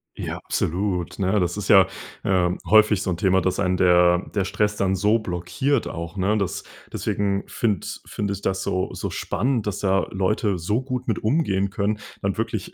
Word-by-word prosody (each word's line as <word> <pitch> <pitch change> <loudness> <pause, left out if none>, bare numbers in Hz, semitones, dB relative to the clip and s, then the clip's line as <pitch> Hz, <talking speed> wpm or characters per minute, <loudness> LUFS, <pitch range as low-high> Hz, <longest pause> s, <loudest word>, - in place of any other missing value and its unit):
Ja, - - -4
absolut, 90 0 -1
ne? 100 +1 +1
Das 90 +1 -1
ist 100 -3 -4
ja, 95 -2 +7 0.4
äh, 90 -2 +2 0.2
häufig 110 -2 +5
so 95 - -2
'n 85 - -1
Thema, 95 +1 +3
dass 90 +1 -1
einen 90 -2 +1
der 90 0 +4
der 100 -2 +1
Stress 105 +2 0
dann 95 -2 +1
so 105 +4 +3
blockiert 110 +7 -1
auch, 85 +2 -6
ne? 100 +3 +1
Das 100 -3 -2 0.3
deswegen 100 -1 -1
finde 105 -8 -1 0.2
finde 100 -1 -3
ich 100 - -7
das 95 0 0
so 95 -1 -2
so - - -4
spannend, 120 -1 -1
dass 105 -3 -2
da 95 -1 +2
Leute 95 0 0
so 105 +9 -1
gut 130 -1 -4
mit 110 - 0
umgehen 100 -7 +1
können, 100 +2 -1 0.2
dann 100 -1 -1
wirklich 110 -3 -3
100 Hz, 190 wpm, -23 LUFS, 90-105 Hz, 0.4 s, ja